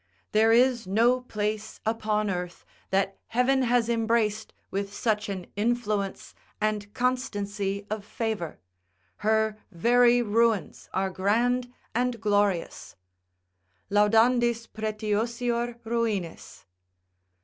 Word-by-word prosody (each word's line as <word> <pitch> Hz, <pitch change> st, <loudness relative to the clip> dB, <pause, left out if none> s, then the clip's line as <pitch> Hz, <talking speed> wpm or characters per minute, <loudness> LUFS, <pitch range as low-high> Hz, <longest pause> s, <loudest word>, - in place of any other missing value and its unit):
There 220 Hz, +1 st, +4 dB
is 240 Hz, -2 st, +3 dB
no 235 Hz, +6 st, +3 dB
place 215 Hz, -2 st, -3 dB
upon 215 Hz, -2 st, 0 dB
earth 180 Hz, -1 st, -5 dB, 0.2 s
that 195 Hz, 0 st, 0 dB
heaven 255 Hz, +3 st, +2 dB
has 245 Hz, -2 st, +2 dB
embraced 225 Hz, -2 st, 0 dB, 0.2 s
with 200 Hz, 0 st, -2 dB
such 215 Hz, -2 st, 0 dB
an 185 Hz, -3 st, -4 dB
influence 210 Hz, -2 st, -1 dB, 0.3 s
and 210 Hz, -1 st, -1 dB
constancy 205 Hz, -6 st, -1 dB
of 215 Hz, -1 st, -4 dB
favour; 215 Hz, -6 st, -3 dB, 0.6 s
her 220 Hz, 0 st, +1 dB
very 240 Hz, +6 st, +4 dB
ruins 225 Hz, -1 st, +1 dB
are 190 Hz, 0 st, -1 dB
grand 240 Hz, +6 st, +1 dB, 0.2 s
and 245 Hz, 0 st, 0 dB
glorious, 205 Hz, -4 st, 0 dB, 1.0 s
"Laudandis 230 Hz, +3 st, +3 dB
pretiosior 230 Hz, +3 st, -2 dB
ruinis." 220 Hz, -7 st, -3 dB
220 Hz, 95 wpm, -27 LUFS, 205-235 Hz, 1.0 s, There